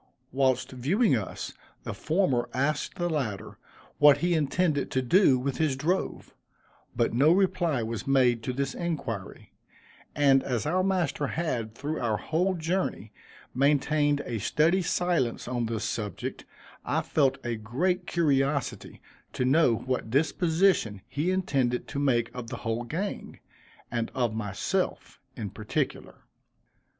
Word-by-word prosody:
Whilst 130 Hz, -1 st, +1 dB
viewing 145 Hz, -, +2 dB
us, 105 Hz, -5 st, -4 dB, 0.3 s
the -, -, -4 dB
former 155 Hz, -8 st, 0 dB
asked 140 Hz, +3 st, -1 dB
the 175 Hz, -, -1 dB
latter, 130 Hz, -, -3 dB, 0.4 s
what 145 Hz, -1 st, +7 dB
he 175 Hz, +1 st, +1 dB
intended 155 Hz, -1 st, +1 dB
to 130 Hz, -, 0 dB
do 140 Hz, 0 st, +5 dB
with 130 Hz, +1 st, -2 dB
his 155 Hz, -4 st, +1 dB
drove; 165 Hz, +8 st, -2 dB, 0.6 s
but -, -, +1 dB
no 140 Hz, +7 st, +5 dB
reply 175 Hz, -8 st, +2 dB
was 110 Hz, 0 st, -4 dB
made 125 Hz, -4 st, +3 dB
to 125 Hz, -, -3 dB
this 135 Hz, +1 st, -2 dB
inquiry 150 Hz, -, -5 dB, 0.6 s
and 135 Hz, -2 st, +5 dB
as 125 Hz, -3 st, -2 dB
our 180 Hz, +5 st, +1 dB
master 175 Hz, -7 st, 0 dB
had, 120 Hz, -10 st, -3 dB
through 150 Hz, +5 st, -3 dB
our 110 Hz, -3 st, 0 dB
whole 180 Hz, -, 0 dB
journey, 165 Hz, -, -2 dB, 0.4 s
maintained 145 Hz, +1 st, +2 dB
a 115 Hz, -3 st, -3 dB
studied 165 Hz, -, +2 dB
silence 170 Hz, -10 st, 0 dB
on 120 Hz, -2 st, -1 dB
this 110 Hz, -1 st, -3 dB
subject, 105 Hz, -3 st, -4 dB, 0.4 s
I -, -, 0 dB
felt 135 Hz, -3 st, +2 dB
a 120 Hz, -1 st, -1 dB
great 170 Hz, -, -1 dB
curiosity 140 Hz, -4 st, 0 dB, 0.3 s
to 125 Hz, -, -1 dB
know 130 Hz, -2 st, +4 dB
what 125 Hz, -1 st, -3 dB
disposition 160 Hz, -, +2 dB
he 150 Hz, +6 st, -1 dB
intended 135 Hz, -10 st, 0 dB
to 140 Hz, -, -3 dB
make 120 Hz, -5 st, +1 dB
of 125 Hz, -2 st, -6 dB
the 120 Hz, 0 st, -6 dB
whole 115 Hz, +1 st, -1 dB
gang, 185 Hz, -, -4 dB, 0.5 s
and 115 Hz, -1 st, -1 dB
of 120 Hz, -4 st, 0 dB
myself 110 Hz, -, -2 dB, 0.2 s
in 105 Hz, -5 st, -4 dB
particular. 105 Hz, +1 st, -4 dB
140 Hz, 140 wpm, -27 LUFS, 120-165 Hz, 0.6 s, what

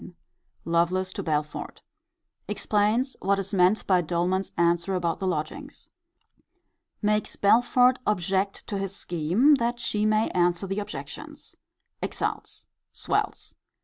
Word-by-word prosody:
Lovelace 180 Hz, +3 st, +1 dB
to -, -, -4 dB
Belford. 150 Hz, -2 st, -3 dB, 0.6 s
Explains 220 Hz, +6 st, 0 dB
what 195 Hz, +1 st, +2 dB
is 195 Hz, +1 st, -4 dB
meant 185 Hz, +3 st, +3 dB
by 185 Hz, -2 st, +3 dB
Doleman's 175 Hz, +3 st, -1 dB
answer 170 Hz, +2 st, +2 dB
about 170 Hz, -2 st, -1 dB
the 190 Hz, -, -2 dB
lodgings. 185 Hz, -, -5 dB, 1.1 s
Makes 210 Hz, 0 st, +1 dB
Belford 245 Hz, +4 st, +4 dB
object 195 Hz, 0 st, 0 dB
to 200 Hz, -, -3 dB
his 195 Hz, 0 st, -3 dB
scheme, 180 Hz, -, +2 dB
that 240 Hz, 0 st, -1 dB
he 215 Hz, -2 st, 0 dB
may 215 Hz, +1 st, +2 dB
answer 175 Hz, +1 st, +1 dB
the 195 Hz, +2 st, -2 dB
objections. 205 Hz, -, -8 dB, 0.5 s
Exults. -, -, -4 dB, 0.3 s
Swells. -, -, -2 dB
195 Hz, 115 wpm, -26 LUFS, 175-215 Hz, 1.1 s, Belford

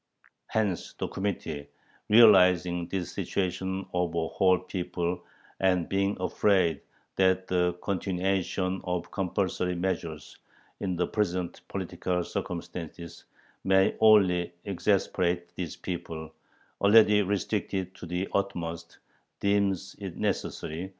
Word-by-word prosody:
Hence, 105 Hz, -5 st, -1 dB
"the -, -, -2 dB
Committee, 80 Hz, -7 st, -3 dB, 0.4 s
realizing 90 Hz, -6 st, +6 dB
this 95 Hz, -2 st, -3 dB
situation 95 Hz, 0 st, -2 dB
of 90 Hz, -2 st, 0 dB
a 80 Hz, -1 st, 0 dB
whole 95 Hz, -1 st, +3 dB
people, 90 Hz, -1 st, -3 dB, 0.4 s
and 90 Hz, -3 st, +2 dB
being 100 Hz, +1 st, 0 dB
afraid 90 Hz, -2 st, +2 dB, 0.4 s
that 95 Hz, 0 st, +3 dB
the 90 Hz, -1 st, +1 dB
continuation 95 Hz, 0 st, -1 dB
of 90 Hz, -1 st, -3 dB
compulsory 90 Hz, -1 st, -1 dB
measures, 85 Hz, -4 st, -4 dB, 0.4 s
in 95 Hz, -3 st, -2 dB
the 90 Hz, +1 st, +1 dB
present 90 Hz, -4 st, -2 dB
political 90 Hz, -1 st, -2 dB
circumstances, 85 Hz, -1 st, -6 dB, 0.4 s
may 95 Hz, 0 st, +4 dB
only 95 Hz, -6 st, +5 dB
exasperate 90 Hz, -2 st, 0 dB
this 85 Hz, -4 st, -4 dB
people, 80 Hz, -3 st, -6 dB, 0.5 s
already 105 Hz, 0 st, +6 dB
restricted 95 Hz, -1 st, -2 dB
to 90 Hz, -, -10 dB
the 90 Hz, +3 st, -2 dB
utmost, 85 Hz, -4 st, -3 dB, 0.4 s
deems 100 Hz, -2 st, +1 dB
it 95 Hz, -4 st, -6 dB
necessary 85 Hz, +5 st, -3 dB
90 Hz, 105 wpm, -28 LUFS, 85-95 Hz, 0.5 s, realizing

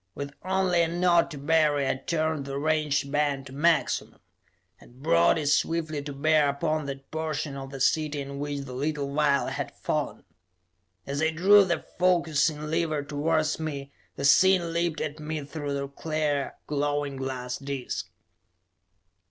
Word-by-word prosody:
With 140 Hz, 0 st, -5 dB
only 185 Hz, -1 st, +2 dB
a 165 Hz, -, +3 dB
nod 175 Hz, 0 st, +3 dB
to 150 Hz, -, -8 dB
Barry, 145 Hz, -1 st, +2 dB
I -, -, +2 dB
turned 155 Hz, +1 st, -2 dB
the 140 Hz, 0 st, -4 dB
range 150 Hz, -2 st, 0 dB
band 145 Hz, -2 st, 0 dB
to 130 Hz, -, -11 dB
maximum, 165 Hz, +4 st, +1 dB, 0.6 s
and 125 Hz, +3 st, -17 dB
brought 85 Hz, -, +4 dB
it 155 Hz, -, -2 dB
swiftly 155 Hz, +1 st, +1 dB
to 145 Hz, 0 st, -6 dB
bear 150 Hz, +1 st, +3 dB
upon 155 Hz, +1 st, -1 dB
that 135 Hz, 0 st, -7 dB
portion 155 Hz, -2 st, -3 dB
of 135 Hz, -1 st, -7 dB
the 135 Hz, 0 st, -8 dB
city 150 Hz, +2 st, +1 dB
in 140 Hz, 0 st, -6 dB
which 145 Hz, -1 st, -3 dB
the 135 Hz, -2 st, -8 dB
little 140 Hz, +1 st, -2 dB
vial 145 Hz, -2 st, +2 dB
had -, -, -5 dB
fallen. -, -, -2 dB, 0.8 s
As 140 Hz, +2 st, -3 dB
I 160 Hz, -, +3 dB
drew 195 Hz, +6 st, +6 dB
the 170 Hz, -2 st, -2 dB
focusing 160 Hz, -4 st, +2 dB
lever 155 Hz, -2 st, -1 dB
towards 155 Hz, +2 st, 0 dB
me, 140 Hz, -3 st, -5 dB, 0.2 s
the 140 Hz, -, -3 dB
scene 175 Hz, +3 st, +5 dB
leaped 170 Hz, -1 st, 0 dB
at 155 Hz, 0 st, -4 dB
me 155 Hz, 0 st, -4 dB
through 145 Hz, -1 st, -4 dB
the 140 Hz, 0 st, -3 dB
clear, 150 Hz, 0 st, -2 dB
glowing 145 Hz, -1 st, -1 dB
glass 130 Hz, -2 st, -4 dB
disc. 135 Hz, -9 st, -4 dB
150 Hz, 160 wpm, -27 LUFS, 140-160 Hz, 0.8 s, drew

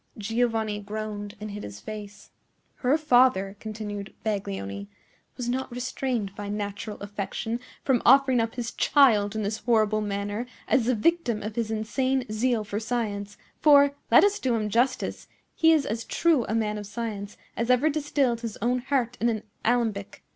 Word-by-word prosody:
Giovanni 225 Hz, -1 st, 0 dB
groaned 205 Hz, 0 st, -5 dB
and 210 Hz, 0 st, -6 dB
hid 205 Hz, +1 st, -6 dB
his 100 Hz, 0 st, -8 dB
face 210 Hz, -1 st, -9 dB, 0.5 s
"Her 265 Hz, +4 st, +2 dB
father," 245 Hz, -10 st, +3 dB
continued 210 Hz, -2 st, -6 dB
Baglioni, 100 Hz, -, -3 dB, 0.5 s
"was 245 Hz, -2 st, -3 dB
not 255 Hz, +2 st, -1 dB
restrained 245 Hz, -4 st, -2 dB
by 205 Hz, 0 st, -6 dB
natural 205 Hz, +1 st, -4 dB
affection 205 Hz, +3 st, -4 dB, 0.2 s
from 260 Hz, -3 st, +2 dB
offering 265 Hz, -1 st, +6 dB
up 225 Hz, 0 st, -1 dB
his 240 Hz, -2 st, -3 dB
child 220 Hz, -8 st, +4 dB
in 215 Hz, -, -1 dB
this 215 Hz, +2 st, -2 dB
horrible 215 Hz, -2 st, +2 dB
manner 205 Hz, +3 st, -3 dB, 0.2 s
as 260 Hz, -5 st, +3 dB
the 255 Hz, -, +3 dB
victim 240 Hz, -4 st, +1 dB
of 215 Hz, 0 st, -5 dB
his 230 Hz, -2 st, -1 dB
insane 255 Hz, +4 st, 0 dB
zeal 225 Hz, +1 st, +1 dB
for 205 Hz, 0 st, -3 dB
science; 210 Hz, -3 st, -3 dB, 0.2 s
for, 285 Hz, -2 st, +6 dB, 0.2 s
let -, -, +7 dB
us 405 Hz, 0 st, +3 dB
do 250 Hz, -3 st, +1 dB
him 215 Hz, -2 st, -1 dB
justice, 245 Hz, +4 st, 0 dB, 0.3 s
he 325 Hz, 0 st, +4 dB
is 310 Hz, -4 st, +3 dB
as 225 Hz, +2 st, -3 dB
true 320 Hz, -5 st, +2 dB
a 220 Hz, -, -2 dB
man 210 Hz, -2 st, 0 dB
of 205 Hz, -, -7 dB
science 205 Hz, -1 st, -5 dB, 0.2 s
as 230 Hz, +1 st, -2 dB
ever 250 Hz, +4 st, +4 dB
distilled 285 Hz, -5 st, 0 dB
his 230 Hz, -3 st, -5 dB
own 245 Hz, +3 st, +1 dB
heart 250 Hz, -2 st, -1 dB
in 235 Hz, -, +3 dB
an 220 Hz, -2 st, -2 dB, 0.2 s
alembic. 225 Hz, -4 st, 0 dB
225 Hz, 170 wpm, -26 LUFS, 205-250 Hz, 0.5 s, let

